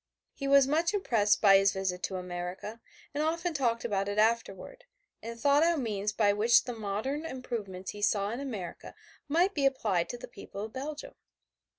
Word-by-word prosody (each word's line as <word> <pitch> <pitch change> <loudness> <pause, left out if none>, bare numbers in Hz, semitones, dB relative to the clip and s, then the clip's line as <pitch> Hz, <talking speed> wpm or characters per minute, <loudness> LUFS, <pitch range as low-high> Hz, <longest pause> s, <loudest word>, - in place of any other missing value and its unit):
He 275 - -5
was 275 -1 +6
much 330 +6 +1
impressed 220 - +2
by 195 -2 +8
his 195 0 +3
visit 190 -2 -2
to 190 - -5
America, 180 +4 -6 0.3
and 290 - -1
often 335 +2 -1
talked 240 -5 0
about 200 -3 -1
it 205 - -3
afterward, 230 - 0 0.4
and 230 +1 -7
thought 285 +4 +4
out 335 0 +3
means 210 -5 -2
by 210 -2 +2
which 225 +3 +4
the 245 - -5
modern 220 +7 -3
improvements 220 - -5
he 205 - -10
saw 205 0 +1
in 235 - -4
America 220 -11 -6 0.3
might 345 +7 +2
be 285 - -1
applied 210 -10 0
to 245 - -5
the - - -9
people 200 +1 -9
of 220 - -11
Belgium. 290 +3 -6
230 Hz, 185 wpm, -30 LUFS, 200-280 Hz, 0.4 s, by